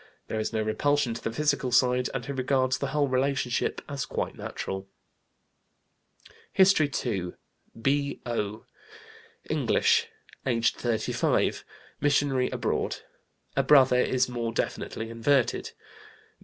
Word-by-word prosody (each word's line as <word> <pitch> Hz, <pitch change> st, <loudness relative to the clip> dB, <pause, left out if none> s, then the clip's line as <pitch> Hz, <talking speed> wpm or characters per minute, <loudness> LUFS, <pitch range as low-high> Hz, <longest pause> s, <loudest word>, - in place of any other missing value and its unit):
There 110 Hz, -, -2 dB
is 110 Hz, -, -2 dB
no 110 Hz, -1 st, 0 dB
repulsion 140 Hz, +3 st, +1 dB
to 115 Hz, -, -7 dB
the 115 Hz, -, -2 dB
physical 145 Hz, -1 st, 0 dB
side, 125 Hz, 0 st, +3 dB
and 130 Hz, -3 st, -4 dB
he -, -, -4 dB
regards 130 Hz, -1 st, +1 dB
the 140 Hz, -, -1 dB
whole 145 Hz, +1 st, +1 dB
relationship 130 Hz, -1 st, 0 dB
as 140 Hz, -2 st, -4 dB
quite -, -, -3 dB
natural. 95 Hz, 0 st, -5 dB, 1.6 s
HISTORY 185 Hz, -6 st, +5 dB, 0.2 s
II. 95 Hz, -7 st, -2 dB, 0.5 s
B.O., 120 Hz, -5 st, -1 dB, 0.8 s
English, -, -, +2 dB, 0.4 s
aged 120 Hz, -3 st, +1 dB
35, 115 Hz, -3 st, 0 dB, 0.4 s
missionary 140 Hz, -3 st, +2 dB
abroad. -, -, -1 dB, 0.6 s
A 135 Hz, -, +4 dB
brother 130 Hz, -2 st, +6 dB
is 130 Hz, 0 st, +2 dB
more 120 Hz, -2 st, -3 dB
definitely 115 Hz, 0 st, -3 dB
inverted. 125 Hz, +3 st, +1 dB
130 Hz, 115 wpm, -27 LUFS, 115-140 Hz, 1.6 s, brother